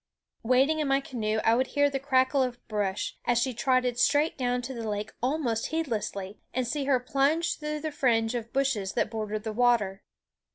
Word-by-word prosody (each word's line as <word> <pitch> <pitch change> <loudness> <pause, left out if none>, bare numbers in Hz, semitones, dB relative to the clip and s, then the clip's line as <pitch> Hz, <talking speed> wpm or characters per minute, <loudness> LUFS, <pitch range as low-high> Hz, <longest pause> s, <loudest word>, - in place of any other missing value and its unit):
Waiting 265 +6 +3
in 300 - 0
my 270 0 +3
canoe 220 -5 -2
I 225 - +4
would 255 +2 +2
hear 285 0 +5
the 275 -1 -2
crackle 265 0 +2
of 250 -2 -1
brush, 205 -3 -2
as 245 - +2
she 255 +2 +1
trotted 250 0 +1
straight 295 +4 +3
down 245 -1 -1
to 265 - -5
the 230 -3 -4
lake 210 0 -3
almost 250 -4 0
heedlessly, 215 -10 -3 0.2
and 255 -1 +1
see 280 +3 -2
her 270 -2 +3
plunge 275 +6 +1
through 300 0 -3
the 310 0 -3
fringe 235 -5 +1
of 235 -1 -4
bushes 255 -8 0
that - - 0
bordered 215 -1 -3
the 220 -1 -4
water. 215 -5 +2
250 Hz, 195 wpm, -28 LUFS, 225-275 Hz, 0.2 s, hear